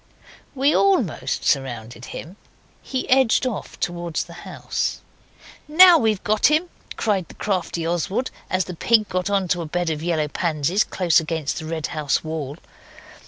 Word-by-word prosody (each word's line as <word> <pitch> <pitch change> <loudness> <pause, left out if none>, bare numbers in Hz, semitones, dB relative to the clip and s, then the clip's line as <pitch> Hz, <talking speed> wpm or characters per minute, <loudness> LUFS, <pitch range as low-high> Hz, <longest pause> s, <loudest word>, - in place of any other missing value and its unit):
We 275 +3 +3
almost 370 - +1
surrounded 120 -3 -1
him. 170 +7 -8 0.5
He 260 -1 -4
edged 260 -2 +4
off 245 -6 -5
towards 175 -2 -2
the - - -13 0.2
house. - - -3 0.7
'Now 345 +2 +8
we've 215 -4 0
got 215 0 +3
him!' 315 +4 +1 0.3
cried 200 -5 0
the - - -14
crafty 180 -4 -2
Oswald, 175 - -1 0.2
as 185 0 +1
the 180 - -6
pig 215 +4 +2
got 185 +1 -1
on 195 -2 +1
to 175 - +1
a 165 - -5
bed 175 +1 -1
of 155 -1 -3
yellow 160 -2 0
pansies 165 +4 0
close 180 -3 +2
against 160 -2 -3
the 160 - -7
red 160 -1 -3
house 150 -3 0
wall. 155 -2 -5
175 Hz, 160 wpm, -22 LUFS, 160-215 Hz, 0.7 s, Now